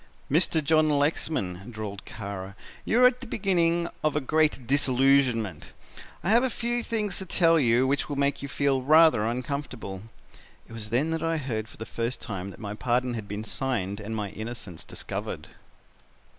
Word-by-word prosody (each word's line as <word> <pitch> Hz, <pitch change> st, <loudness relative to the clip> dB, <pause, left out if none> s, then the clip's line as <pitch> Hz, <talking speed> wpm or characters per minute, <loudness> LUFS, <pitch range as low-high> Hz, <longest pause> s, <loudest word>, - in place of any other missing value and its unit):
"'Mr. 160 Hz, 0 st, +3 dB
John 155 Hz, +1 st, +4 dB
Lexman,' 140 Hz, -, 0 dB
drawled 105 Hz, -3 st, -6 dB
Kara, 100 Hz, -2 st, -7 dB, 0.3 s
'you 245 Hz, +3 st, +3 dB
are -, -, +9 dB
at 250 Hz, 0 st, +4 dB
the 260 Hz, -, -7 dB
beginning 175 Hz, -5 st, +1 dB, 0.2 s
of 155 Hz, -1 st, +1 dB
a -, -, +3 dB
great 150 Hz, -2 st, +1 dB
disillusionment. 130 Hz, -, +2 dB, 0.5 s
I 190 Hz, -, +2 dB
have 235 Hz, +3 st, +5 dB
a 260 Hz, -, +2 dB
few 240 Hz, 0 st, -1 dB
things 215 Hz, -4 st, -1 dB
to 190 Hz, -, -5 dB
tell 165 Hz, -1 st, +4 dB
you 120 Hz, -1 st, +3 dB
which 140 Hz, +3 st, 0 dB
will 145 Hz, -, -2 dB
make 140 Hz, 0 st, 0 dB
you 140 Hz, -, -4 dB
feel 140 Hz, -1 st, +1 dB
rather 155 Hz, -5 st, +5 dB
uncomfortable.' 125 Hz, -5 st, -4 dB, 0.7 s
It -, -, -13 dB
was 110 Hz, -2 st, -7 dB
then 135 Hz, +8 st, +1 dB
that 165 Hz, -1 st, -1 dB
I 165 Hz, 0 st, 0 dB
heard 115 Hz, -7 st, -3 dB
for -, -, -14 dB
the 110 Hz, -, -6 dB
first 115 Hz, +2 st, -3 dB
time 95 Hz, -2 st, -5 dB
that 95 Hz, -, -12 dB
my 105 Hz, -1 st, -5 dB
pardon 125 Hz, +2 st, 0 dB
had 110 Hz, -3 st, -5 dB
been 105 Hz, +1 st, -5 dB
signed 110 Hz, -5 st, -2 dB
and 110 Hz, +2 st, -5 dB
my 105 Hz, -3 st, -3 dB
innocence 110 Hz, -6 st, -7 dB
discovered. -, -, -6 dB
130 Hz, 180 wpm, -27 LUFS, 110-160 Hz, 0.7 s, are